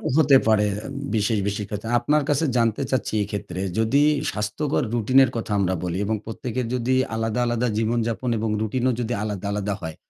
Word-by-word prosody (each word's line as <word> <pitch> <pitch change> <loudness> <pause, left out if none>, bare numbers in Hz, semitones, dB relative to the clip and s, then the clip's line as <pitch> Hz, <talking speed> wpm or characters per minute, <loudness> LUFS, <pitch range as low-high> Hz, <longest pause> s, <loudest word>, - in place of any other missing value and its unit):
হতে 145 -4 +6
পারে 105 -1 +4 0.5
বিশেষ, 110 +1 +1
বিশেষ 100 0 -2
ক্ষেত্রে। 105 +2 -5
আপনার 150 +4 +2
কাছে 145 +3 +2
জানতে 115 +1 +1
চাচ্ছি 130 -4 -1
এক্ষেত্রে 95 -3 -5 0.2
যদি 130 +6 +3 0.3
স্বাস্থ্যকর 105 +8 -1
রুটিনের 130 +3 +4
কথা 115 -2 -4
আমরা 95 -1 +1
বলি 90 0 -2
এবং 110 +1 0
প্রত্যেকের 125 +2 -4
যদি 125 +1 0 0.2
আলাদা, 115 +1 -1
আলাদা 120 +1 0
জীবনযাপন 115 +2 0
এবং 110 0 -1
রুটিনও 125 +4 0
যদি 120 0 -1
আলাদা, 105 -2 -4
আলাদা 105 0 -1
হয়, 80 -1 -5
115 Hz, 165 wpm, -23 LUFS, 105-125 Hz, 0.5 s, হতে